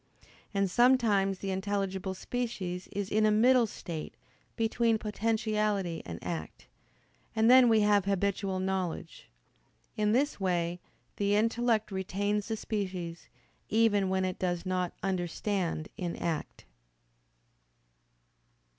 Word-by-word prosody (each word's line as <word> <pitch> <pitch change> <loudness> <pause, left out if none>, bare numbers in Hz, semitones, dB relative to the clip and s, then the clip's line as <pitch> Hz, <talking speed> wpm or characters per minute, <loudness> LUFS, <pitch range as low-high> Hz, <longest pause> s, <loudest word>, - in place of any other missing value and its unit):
And 200 -1 +1
sometimes 210 -3 +3
the 195 +1 -4
intelligible 190 -1 -2
species 195 -6 -4
is 200 0 -4
in 215 +1 +3
a 215 - +5
middle 235 +3 +5
state, 165 -6 -7 0.4
between 230 0 +2
potentiality 215 -4 -1
and 85 -1 -5
act: 85 -3 -5 0.7
and 225 +2 +5
then 255 -1 +8
we 220 -1 +5
have 205 -2 +3
habitual 195 -1 0
knowledge. 185 -3 -3 0.7
In 210 -1 +1
this 275 +4 +1
way 175 -2 0 0.4
the 200 0 +2
intellect 225 0 +1
retains 200 +2 -1
the 220 -1 -2
species, 185 -6 -4 0.4
even 210 -3 +3
when 190 0 +1
it 185 -1 -3
does 175 -1 -1
not 185 -1 -1
understand 180 -2 -1
in 175 -2 -3
act. 165 -3 -4
200 Hz, 115 wpm, -30 LUFS, 185-220 Hz, 0.7 s, then